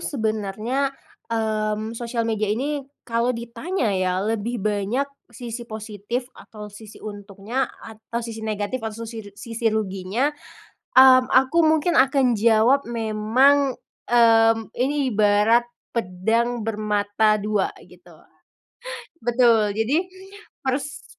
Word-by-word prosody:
sebenarnya, 220 Hz, +2 st, -1 dB, 0.4 s
mmm, 215 Hz, -1 st, -1 dB
sosial 235 Hz, 0 st, -3 dB
media 215 Hz, -2 st, -1 dB
ini 280 Hz, +8 st, -1 dB, 0.2 s
kalau 235 Hz, +1 st, 0 dB
ditanya 235 Hz, -, -2 dB
ya, 185 Hz, 0 st, 0 dB
lebih 225 Hz, +2 st, -2 dB
banyak 210 Hz, +5 st, 0 dB, 0.2 s
sisi 235 Hz, 0 st, -8 dB
positif 215 Hz, +3 st, -5 dB
atau 210 Hz, -1 st, -11 dB
sisi 215 Hz, 0 st, -12 dB
untungnya 205 Hz, +4 st, -4 dB, 0.2 s
atau 225 Hz, +1 st, -6 dB
sisi 225 Hz, -1 st, -7 dB
negatif 215 Hz, +3 st, -3 dB
atau 225 Hz, +1 st, -5 dB
sisi 220 Hz, -2 st, -8 dB
ru -, -, -14 dB
sisi 230 Hz, +1 st, -4 dB
ruginya, 215 Hz, +5 st, -1 dB, 0.6 s
hmm, 255 Hz, -1 st, +8 dB
aku 265 Hz, +6 st, +3 dB
mungkin 315 Hz, +2 st, +3 dB
akan 270 Hz, -3 st, +4 dB
jawab 230 Hz, +4 st, +3 dB
memang, 240 Hz, +5 st, +2 dB, 0.3 s
hmm, 225 Hz, -2 st, +4 dB
ini 270 Hz, 0 st, 0 dB
ibarat 215 Hz, +3 st, +3 dB, 0.2 s
pedang 230 Hz, +3 st, -1 dB
bermata 210 Hz, 0 st, +1 dB
dua, 210 Hz, -1 st, 0 dB, 0.2 s
gitu. -, -, -18 dB, 1.1 s
Betul, 230 Hz, -3 st, +3 dB
jadi, 230 Hz, +8 st, +1 dB, 0.7 s
pers 270 Hz, +1 st, -3 dB
225 Hz, 110 wpm, -23 LUFS, 215-245 Hz, 1.1 s, hmm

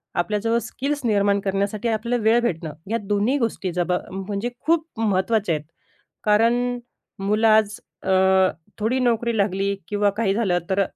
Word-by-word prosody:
आपल्याजवळ 210 Hz, +6 st, 0 dB
स्किल्स 280 Hz, +6 st, -3 dB
निर्माण 200 Hz, -2 st, +2 dB
करण्यासाठी 200 Hz, +3 st, -1 dB
आपल्याला 230 Hz, +1 st, -1 dB
वेळ 225 Hz, +2 st, +5 dB
भेटणं, 165 Hz, -9 st, -2 dB, 0.2 s
या 230 Hz, -, +2 dB
दोन्ही 205 Hz, +7 st, +1 dB
गोष्टी 225 Hz, -6 st, -2 dB
जबा 180 Hz, 0 st, 0 dB
म्हणजे 200 Hz, +4 st, -3 dB, 0.2 s
खूप 325 Hz, 0 st, +2 dB
महत्त्वाच्या 200 Hz, -3 st, +1 dB
आहेत. 150 Hz, 0 st, -6 dB, 0.6 s
कारण 235 Hz, +4 st, +2 dB, 0.4 s
मुलं 210 Hz, +3 st, +2 dB
आज 215 Hz, -1 st, +3 dB, 0.2 s
अ, -, -, -6 dB, 0.7 s
थोडी 225 Hz, +5 st, 0 dB
नोकरी 235 Hz, -2 st, +1 dB
लागली 200 Hz, 0 st, 0 dB
किंवा 205 Hz, 0 st, +1 dB
काही 210 Hz, -3 st, +1 dB
झालं 200 Hz, -5 st, +1 dB
तर 195 Hz, +1 st, +3 dB
210 Hz, 140 wpm, -23 LUFS, 195-230 Hz, 0.7 s, वेळ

